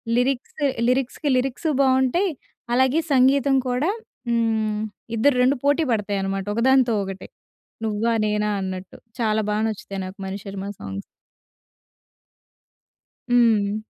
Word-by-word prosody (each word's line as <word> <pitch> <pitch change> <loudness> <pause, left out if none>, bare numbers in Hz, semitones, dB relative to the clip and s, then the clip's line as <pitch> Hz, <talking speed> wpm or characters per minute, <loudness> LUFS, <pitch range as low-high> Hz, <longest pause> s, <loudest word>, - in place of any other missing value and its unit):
Lyrics 250 +1 0 0.3
లిరిక్స్‌కి 265 +3 0
lyrics 270 +5 -1
బావుంటాయి, 265 +8 +2 0.4
అలాగే 260 +5 +3
సంగీతం 270 +1 +4
కూడా 260 +9 +1 0.4
హ్మ్, 220 -2 +1 0.4
ఇద్దరు 280 +4 +4
2 275 +3 +3
పోటీ 290 +3 +3
పడతాయి 205 -2 -1
అనమాట 195 0 -2
ఒకదానితో 250 -1 +4
ఒకటే. 195 0 -7 0.6
నువ్వా 220 +2 0
నేనా 210 0 0
అన్నట్టు 185 -1 -6 0.2
చాలా 220 -2 +1
బా 210 - 0
నచ్చుతాయి 200 -2 -5
నాకు 185 - -9
మణిశర్మ 195 0 -6
సాంగ్స్. 95 0 -6 2.3
హ్మ్. 220 -4 +3
230 Hz, 110 wpm, -23 LUFS, 205-265 Hz, 2.3 s, సంగీతం